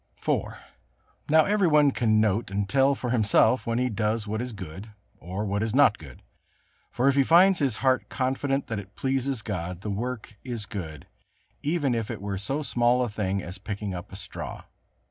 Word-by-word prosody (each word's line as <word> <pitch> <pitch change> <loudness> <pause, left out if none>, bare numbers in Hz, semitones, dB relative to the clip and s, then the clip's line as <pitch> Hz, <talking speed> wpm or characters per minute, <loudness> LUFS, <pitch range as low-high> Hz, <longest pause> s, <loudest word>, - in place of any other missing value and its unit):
IV. - - 0 0.8
Now 155 +1 +6
every 205 -2 +2
one 150 -3 +5
can 110 -4 +2
note 110 0 +1
and 100 0 -1
tell 135 +3 +3
for 125 -2 -4
himself 115 +2 +3
when 115 0 0
he 125 +1 +1
does 110 -1 -1
what 110 +2 -3
is 125 0 -4
good 95 0 -8 0.3
or 95 +5 -4
what 100 0 -1
is 110 +1 -1
not 145 - +5
good; - - -13 0.7
for 125 +3 0
if 140 - +5
he 140 0 +4
finds 180 +5 +5
his 140 -4 +1
heart 130 -1 +2
confident 135 +1 -1
that 110 -3 -3
it 100 0 -12
pleases 135 -3 -1
God, 90 -4 -4
the 105 - -4
work 110 0 -5
is 120 -5 -4
good, 80 -9 -7 0.6
even 145 -4 0
if 115 -2 -2
it 115 - -4
were 100 -1 -4
so 135 +10 -2
small 120 -1 +2
a 120 - -2
thing 100 -2 -2
as 90 +3 -7
picking 105 -2 -4
up 90 +2 -7
a - - -8
straw. 100 - -7
115 Hz, 195 wpm, -26 LUFS, 100-135 Hz, 0.8 s, Now